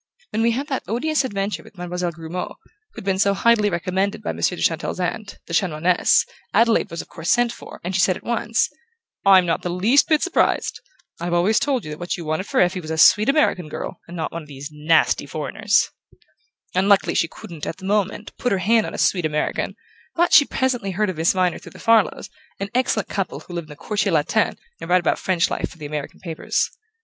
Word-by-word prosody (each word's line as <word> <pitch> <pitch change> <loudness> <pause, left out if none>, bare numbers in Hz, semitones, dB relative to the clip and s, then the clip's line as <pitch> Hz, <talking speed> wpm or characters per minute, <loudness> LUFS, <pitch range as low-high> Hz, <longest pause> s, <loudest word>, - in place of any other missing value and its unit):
When 220 - -1
we 230 - +3
had 255 +5 -1
that 265 - -2
odious 275 - 0
adventure 200 -4 -2
with 200 - -18
Mademoiselle 180 0 -3
Grumeau, 165 +2 -6 0.4
who'd - - -9
been 190 -1 0
so 200 0 +3
highly 215 0 +3
recommended 190 +3 -1
by - - -1
Monsieur 180 - 0
de - - -3
Chantelle's 165 +2 0
aunt, 195 +3 -3
the 165 - -8
Chanoinesse, 170 0 +3 0.3
Adelaide 230 +1 +3
was 165 -1 -5
of - - -22
course 165 +1 -6
sent 240 -1 +3
for, - - -11
and 180 +2 -3
she 180 - +2
said 185 -1 +3
at - - -15
once: 230 -1 0 0.6
'I'm 190 -2 +7
not 165 -1 0
the 180 - -3
least 205 +11 +3
bit 310 -2 +3
surprised. 370 - +1 0.4
I've 175 +1 -1
always 195 +6 +3
told 265 - 0
you 155 - -6
that 150 - -7
what 175 0 -3
you 170 - -7
wanted 155 +5 -2
for - - 0
Effie 180 +1 +2
was 155 - -9
a 160 - -2
sweet 210 +8 +6
American 230 - +2
girl, - - -6
and 175 +1 -8
not 160 - -3
one 170 - -5
of 150 - -14
these 140 +1 -8
nasty 155 +2 +2
foreigners.' 210 +8 0 0.8
Unluckily 195 +2 +3
she 165 - +2
couldn't, 165 -1 -9
at - - -4
the 190 - -10
moment, 205 +1 -1
put 245 - -1
her 195 - +2
hand 215 +4 +2
on - - -6
a - - -5
sweet 180 -3 +2
American; 150 0 -2 0.4
but 345 +1 +2
she 290 - +8
presently 255 -8 -1
heard 200 +1 0
of 175 - -11
Miss 160 +1 +3
Viner 185 -2 +1
through - - -13
the - - -13
Farlows, 225 -3 +2 0.3
an 200 0 -3
excellent 255 +1 +1
couple 195 -2 -3
who 180 - -11
live 170 -2 -4
in - - -20
the 150 - -9
Quartier 205 +5 -1
Latin 150 -2 +1 0.2
and - - -8
write 180 +1 +5
about - - 0
French 185 -2 +1
life - - -2
for - - -15
the 155 - -8
American 150 -1 -5
papers. 165 -3 -2
185 Hz, 225 wpm, -22 LUFS, 170-215 Hz, 0.8 s, she